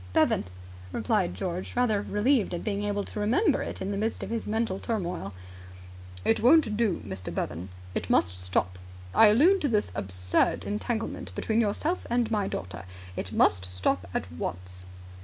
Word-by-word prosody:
"Bevan," - - +3 0.5
replied 90 - 0
George, 180 - -4
rather 230 -5 +2
relieved 210 -1 +1
at 170 - -5
being 205 -1 -1
able 205 0 -1
to 210 - -6
remember 280 - +2
it - - -4
in 195 - -2
the 200 - -2
midst 220 +3 -1
of - - -5
his 230 -1 -2
mental 220 -3 0
turmoil. 180 - -3 0.9
"It 225 - +3
won't 250 -3 +5
do, 225 -2 +1
Mr. 95 -2 -5
Bevan. 85 +5 -3 0.2
It - - -3
must 90 +1 +3
stop. 90 0 -1 0.3
I 225 - +8
allude 325 - +5
to 290 - +2
this 210 -3 +1
absurd 90 -1 +1
entanglement 225 +2 -3
between 225 +1 +1
yourself 300 - -1
and 235 -1 +1
my 205 -3 +1
daughter. 90 +1 -5 0.3
It - - -4
must 90 +1 +3
stop 90 0 -1
at - - -2
once." 90 +2 -3
205 Hz, 165 wpm, -28 LUFS, -, 0.9 s, I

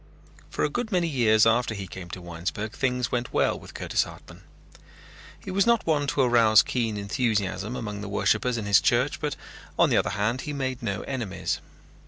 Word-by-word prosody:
For - - -2
a - - +2
good 245 -2 -3
many 180 -3 +2
years 115 -7 +4
after 115 0 +2
he 100 -1 -5
came 90 -1 -9
to 90 0 -8
Winesburg 85 +5 -4
things 125 -3 -1
went 120 0 -2
well - - +1
with - - -13
Curtis - - 0
Hartman. - - -9 1.0
He 190 - -7
was 195 +3 +2
not 235 -1 +3
one 150 -3 +1
to 140 - +1
arouse 115 -4 +5
keen 115 -4 -1
enthusiasm 100 -1 -1
among 105 -4 -5
the 105 - -6
worshippers 110 +4 +1
in 110 - -4
his 100 -1 +5
church 135 +4 +1
but 150 -2 -2 0.4
on - - +4
the - - +4
other - - +1
hand 105 +6 -1
he 150 - -5
made 130 -3 -3
no 100 -5 -2
enemies. 120 -8 -3
115 Hz, 195 wpm, -26 LUFS, 105-130 Hz, 1.0 s, arouse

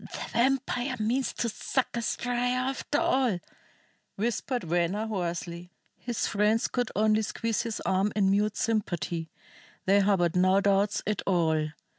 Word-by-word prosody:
"The - - -5
vampire 260 0 +1
means 240 +5 0
to 235 - -1
suck 250 +4 -2
us 235 -1 -1
dry 245 0 0
after 255 +3 -1
all!" 260 - +2 0.8
whispered 240 +4 -1
Venner 175 +5 0
hoarsely. 175 -3 -4 0.3
His 240 -2 -3
friends 210 +2 +2
could 245 -2 -1
only 215 +1 +3
squeeze 225 +1 -1
his 230 -2 -4
arm 190 +2 +1
in 195 -2 +3
mute 210 +1 +1
sympathy. 175 -7 -1 0.6
They 195 +2 +5
harbored 190 -4 +2
no 185 +2 +4
doubts 200 +1 +2
at 210 -1 -1
all. 160 -4 +2
210 Hz, 140 wpm, -28 LUFS, 185-240 Hz, 0.8 s, They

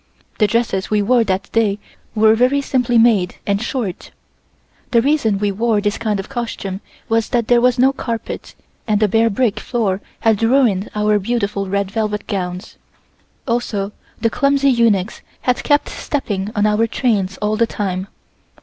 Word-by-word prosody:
The 210 - +4
dresses 225 -4 -1
we 210 -1 +2
wore 240 +2 +3
that 195 0 -2
day 215 -3 +1 0.4
were 220 0 +5
very 250 +5 +3
simply 250 -3 +1
made 220 -6 +3
and 200 0 0
short. 235 -6 -4 0.8
The 235 - +4
reason 240 -5 +2
we 205 0 0
wore 220 +2 +1
this 205 0 -1
kind 215 -3 -1
of 195 - -5
costume 225 -6 -5 0.3
was 225 0 +1
that 235 -3 0
there 240 -1 +4
was 250 0 +3
no 265 +2 +4
carpet 230 -4 -5 0.3
and 210 -2 +2
the 215 - +3
bare 225 +3 +3
brick 220 0 0
floor 205 -6 -1 0.2
had 220 -2 +2
ruined 225 -5 +2
our 210 0 +2
beautiful 200 -2 -2
red 200 0 -1
velvet 210 -2 -2
gowns, 180 0 -4 0.7
also 220 -4 -1 0.3
the 230 - +1
clumsy 275 +1 +2
eunuchs 225 -5 +1 0.2
had 250 -1 0
kept 290 0 +2
stepping 205 -9 -3
on 205 0 +2
our 215 +2 +2
trains 205 -6 0
all 210 0 -1
the 230 +1 +2
time. 190 -3 -3
220 Hz, 165 wpm, -18 LUFS, 200-240 Hz, 0.8 s, were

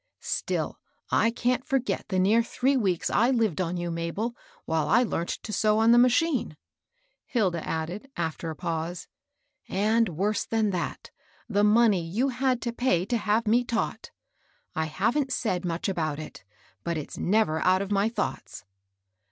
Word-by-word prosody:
" - - -56 0.2
Still - - -3 0.3
I 230 - +4
can't 245 +2 0
forget 265 -2 -1
the 190 - -1
near 205 +5 +4
three 255 +4 0
weeks 190 -9 0
I 235 +4 +3
lived 225 - +1
on 180 0 -2
you, 175 0 -3
Mabel, 170 +8 -3 0.3
while 160 -2 0
I 235 +7 +5
learnt 170 -7 -2
to 215 - -5
sew 215 +2 +2
on 225 +1 +5
the 240 - +7
ma 250 - +7
chine," 255 - 0 0.7
Hilda 185 -9 0
added, 175 +10 -4
after 165 0 -3
a 160 - -5
pause; 170 +1 -4 0.6
"and, 215 +3 +2
worse 195 +6 0
than 220 -2 0
that, 180 -2 -4 0.4
the 205 -3 +1
money 210 -3 +4
you 215 +12 0
had 255 -1 0
to 235 - -2
pay 210 -8 +1
to 240 +4 0
have 220 +1 +1
me 235 +3 +4
taught. 235 -1 -3 0.7
I 160 - 0
haven't 240 - 0
said 190 -8 -1
much 170 -1 -2
about 160 -6 -1
it; 155 -9 -9 0.4
but 170 -1 -2
it's 150 - -6
never 185 -5 +2
out 185 +3 +3
of 200 - -7
my 200 +2 +2
thoughts." 110 - -4
205 Hz, 170 wpm, -27 LUFS, 170-235 Hz, 0.7 s, the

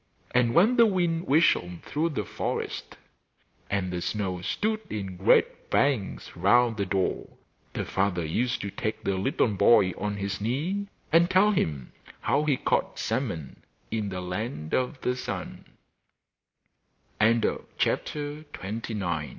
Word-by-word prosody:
And 120 -1 +3
when 220 +8 +5
the 230 -1 +7
wind 175 -3 0
whistled 110 - +2
through 160 +3 -1
the 120 -10 -3
forest, - - -4 0.7
and 95 -2 -1
the 90 - -2
snow 95 -2 -2
stood 215 - -1
in 95 -3 -4
great 95 - +2
banks 130 -9 0
round 115 +6 +4
the 100 -2 -1
door, 95 0 -1 0.4
the - - -3
father 95 -3 0
used 120 +11 0
to 100 - -4
take 110 +2 -3
the 100 - 0
little 110 +5 +1
boy 100 -1 +5
on 105 +3 -3
his 100 0 -3
knee 160 - -1 0.2
and 170 +2 +5
tell 190 +3 +5
him 75 - -1 0.3
how 145 +2 +1
he 145 -4 +2
caught - - 0
salmon 100 - -3 0.3
in 110 -2 -1
the 90 -1 -4
Land 90 - -4
of 130 +3 0
110 Hz, 125 wpm, -27 LUFS, 95-150 Hz, 0.7 s, the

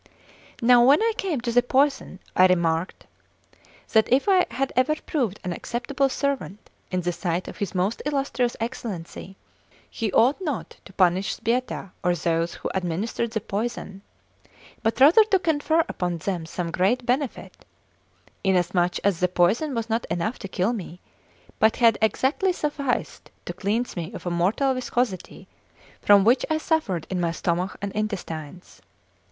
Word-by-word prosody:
Now 240 0 +7
when 275 +4 +6
I 450 +1 +1
came 370 - -2
to 240 0 -2
the 245 +1 +5
poison, 270 -4 +1 0.2
I 185 - +7
remarked 170 -1 0 0.9
that 220 0 +3
if 265 +7 +3
I 375 -2 +4
had 260 +3 -2
ever 255 +5 +3
proved 245 - -2
an 180 -2 -2
acceptable 270 +7 -1
servant 270 -8 -3 0.2
in 185 0 -1
the 175 0 -1
sight 175 0 -2
of - - -8
his 200 -3 -4
most 190 +5 0
illustrious 275 -4 -1
Excellency, 195 -5 -6 0.5
he 220 -4 -3
ought 255 - +3
not 305 -7 -4
to 195 - -14
punish 185 +1 +2
Sbietta 235 -4 -2
or 180 -1 +2
those 165 0 -1
who - - -5
administered 190 +6 -2
the 220 -1 -3
poison, 205 -2 -4 0.8
but 225 +2 -1
rather 315 +11 +8
to 405 -2 +3
confer 320 -1 +1
upon 175 -1 -2
them 170 -1 -3
some 170 0 -4
great 200 +9 +1
benefit, 260 +1 -2 0.8
inasmuch 180 -2 +1
as 195 -4 +1
the 180 - +3
poison 205 - +1
was 230 -1 -2
not 225 +1 -1
enough 175 +8 -2
to 195 - -6
kill 185 +4 0
me, 180 -5 -7 0.6
but 220 0 +4
had 230 -3 +4
exactly 265 - +1
sufficed 290 -5 -3 0.2
to - - -5
cleanse 220 +5 -2
me 170 -2 -5
of - - -9
a 175 - -1
mortal 200 +11 +1
viscosity 245 -5 -3 0.5
from 205 -1 +6
which 240 +5 +4
I 315 - +2
suffered 310 - -1
in 180 -1 -1
my 170 -1 0
stomach 175 +2 -2
and 200 - -2
intestines. 180 -6 -5
220 Hz, 160 wpm, -24 LUFS, 180-260 Hz, 0.9 s, rather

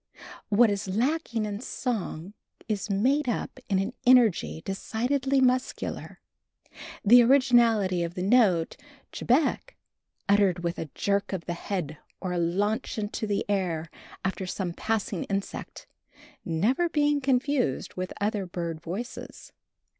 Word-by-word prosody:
What 220 +1 +5
is 200 -1 -3
lacking 235 +2 0
in 205 -1 -4
song 210 - -4 0.3
is 215 -2 -2
made 255 +8 +2
up 235 - -3
in 195 - +2
an 195 +5 -1
energy 240 -10 +4
decidedly 260 +7 0
muscular, 255 0 -1 0.9
the 240 +4 +8
originality 235 -7 +4
of 170 +1 -5
the 180 - -3
note 195 -6 +3 0.3
chebec, 300 - 0 0.5
uttered 195 -4 +3
with 170 +1 -2
a 160 - -5
jerk 200 0 0
of 185 -3 -4
the 175 - -2
head 170 -4 -4 0.2
or 185 -2 -3
a 175 - 0
launch 205 +9 -1
into 215 +1 -3
the 205 -1 -1
air 175 -5 -1 0.3
after 190 0 -2
some 180 -1 -3
passing 215 -2 -2
insect, 195 0 -5 0.6
never 225 - +1
being 295 -2 +2
confused 260 - 0
with 185 0 -4
other 205 -2 -1
bird 170 -2 -4
voices. 195 +10 -7
205 Hz, 130 wpm, -27 LUFS, 185-245 Hz, 0.9 s, the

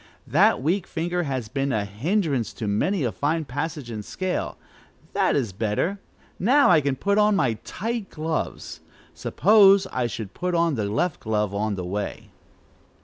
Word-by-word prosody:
That - - +3
weak 180 +5 0
finger 175 +1 -2
has 130 -5 -2
been 135 +4 -1
a 105 -4 0
hindrance 135 - -1
to 110 - -5
many 155 - +1
a 120 - 0
fine 155 +5 -1
passage 145 -1 -4
and 105 -2 -5
scale. 185 - -3 0.6
That - - +2
is 115 -9 -1
better! 110 - -1 0.4
Now 260 +3 +5
I 160 -3 +6
can 140 -1 0
put 200 +8 +1
on 210 0 +4
my 120 - +1
tight 225 0 -4
gloves. 160 0 -4 0.3
Suppose 200 -1 +5
I 125 -1 0
should 110 -3 -6
put 180 0 -2
on 170 -1 +2
the 110 -6 -1
left 155 - 0
glove 105 -2 -1
on 105 +1 -1
the 90 -2 -5
way." 100 +3 -5
145 Hz, 165 wpm, -24 LUFS, 110-180 Hz, 0.6 s, I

